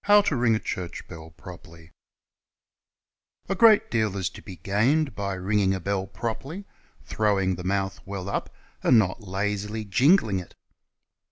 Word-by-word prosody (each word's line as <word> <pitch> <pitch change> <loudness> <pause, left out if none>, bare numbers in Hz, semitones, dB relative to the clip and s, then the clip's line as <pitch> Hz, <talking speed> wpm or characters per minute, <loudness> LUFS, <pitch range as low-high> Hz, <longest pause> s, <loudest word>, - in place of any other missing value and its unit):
21 205 -10 +4
RING 120 -2 +3
THE 90 -5 -3 0.2
BELL 80 0 -10
CORRECTLY 85 -2 -13 1.6
GREAT 215 +2 +5
deal 110 -4 0
is 95 -2 -1
to - - -12
be 95 - -10
gained 120 - +1
by 100 -1 -3
ringing 95 +1 +1
a - - -4
bell 95 +1 -2
]iroperly, 120 - -5 0.4
throwing 100 -3 +1
the 90 0 -6
mouth 95 0 -1
well 95 -1 -6
up, 100 - -3 0.3
and 125 - +5
not 100 0 +1
lazil\ 105 +2 -3
jingling 110 - +3
it. 90 - -11
100 Hz, 140 wpm, -25 LUFS, 95-115 Hz, 1.6 s, GREAT